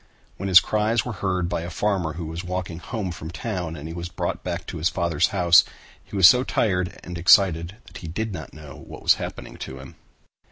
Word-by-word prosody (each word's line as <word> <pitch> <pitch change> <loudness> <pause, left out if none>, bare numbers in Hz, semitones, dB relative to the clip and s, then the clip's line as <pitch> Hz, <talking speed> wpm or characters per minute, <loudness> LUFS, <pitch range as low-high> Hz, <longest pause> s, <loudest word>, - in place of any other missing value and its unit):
When 100 +1 -4
his 90 -1 +10
cries 110 +1 0
were 125 - -3
heard 95 -4 -1
by 85 - -2
a 85 - -5
farmer 90 -3 -1
who 85 +1 -6
was 80 +2 -6
walking 90 -2 -4
home 100 -1 -4
from 80 -2 -8
town 90 -4 -4
and 75 0 -8
he 80 - -6
was 85 0 -6
brought - - -4
back - - -4
to - - -6
his 80 - +2
father's 85 -4 +1
house, 90 -4 +5 0.4
he - - -11
was 95 -3 +8
so 125 +6 +5
tired 90 -8 -1
and 90 -1 -7
excited 90 0 +4
that - - -12
he 85 - -8
did 105 +6 -3
not 80 -5 -7
know 75 -2 -12
what - - -10
was - - +6
happening - - -7
to 65 - -7
him. 65 0 -11
90 Hz, 220 wpm, -24 LUFS, 85-100 Hz, 0.4 s, his